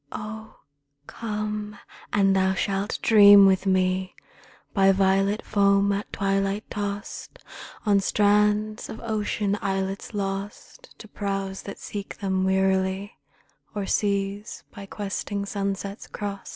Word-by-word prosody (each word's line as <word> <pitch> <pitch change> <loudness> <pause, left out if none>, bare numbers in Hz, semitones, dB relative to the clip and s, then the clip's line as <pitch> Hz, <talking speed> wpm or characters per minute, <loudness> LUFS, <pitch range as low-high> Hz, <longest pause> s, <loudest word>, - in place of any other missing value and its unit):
Ohl 220 +1 -8 0.5
come! 210 0 -4 0.3
and 195 -1 +3
thou 190 0 +2
shalt 195 +2 -1
dream 205 -2 +8
with 190 0 +3
me 185 0 +1 0.6
By 195 -2 +5
violet 195 +2 +2
foam 200 -1 +3
at 200 +1 -3
twilight 195 +1 -1
tost 205 0 -5 0.5
On 205 -2 +4
strands 210 +2 +2
of 220 - -7
ocean 210 -2 -1
islets 195 +2 -3
lost 200 - -5
To 215 - -12
prows 195 -2 -4
that 200 - -8
seek 205 -1 -7
them 190 -2 -1
wearily, 190 +1 0 0.6
O'er 205 -1 -2
seas 200 +1 -1
by 200 -2 -9
questing 200 0 -4
sunsets 200 0 -4
crost. 200 -1 -6
200 Hz, 115 wpm, -25 LUFS, 195-210 Hz, 0.6 s, dream